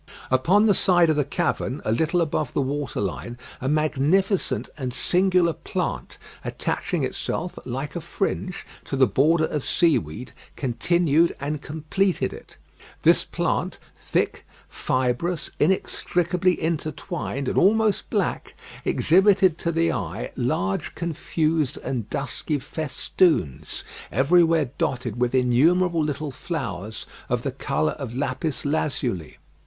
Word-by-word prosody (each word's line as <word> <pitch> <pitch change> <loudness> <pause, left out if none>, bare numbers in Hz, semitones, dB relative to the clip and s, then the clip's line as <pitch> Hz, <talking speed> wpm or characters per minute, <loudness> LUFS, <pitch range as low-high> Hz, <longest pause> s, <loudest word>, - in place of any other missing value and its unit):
Upon 175 +12 +4
the 210 - +5
side 175 -4 +4
of - - +1
the 145 - +2
cavern, 135 -1 -1
a 110 - +1
little 160 +9 +2
above 155 -4 -1
the - - +2
water 140 -1 -3
line, 105 +5 -3 0.2
a 130 - -1
magnificent 155 +6 +1
and 130 -4 -4
singular 180 -1 +3
plant, - - -4 0.3
attaching - - -2
itself, 175 +1 -3
like 135 +5 -4
a 170 - -3
fringe, 185 +1 -3 0.2
to - - -3
the 135 -1 +5
border 155 - +3
of 150 -3 -3
seaweed, 125 - +1 0.2
continued 165 +5 +2
and 145 +1 -3
completed 160 +6 -1
it. - - -13 0.5
This - - +5
plant, - - -1 0.2
thick, - - -1 0.2
fibrous, 130 +7 -1
inextricably 180 +1 +1
intertwined, 155 -2 -3
and - - +2
almost 215 +2 +3
black, - - -1 0.3
exhibited 190 0 +4
to 170 - 0
the 165 0 +2
eye 100 -1 -4
large 95 -6 -1
confused 160 -3 -1
and 120 -5 -3
dusky 145 +2 -2
festoons, 155 - 0 0.3
everywhere 160 +1 +3
dotted 120 -3 -1
with 125 +1 +1
innumerable 160 +8 +3
little 150 0 -2
flowers 110 - -5 0.2
of - - 0
the - - -1
colour 75 0 -1
of 120 -4 -5
lapis 145 +2 -2
lazuli. 130 - -1
150 Hz, 125 wpm, -24 LUFS, 130-170 Hz, 0.5 s, the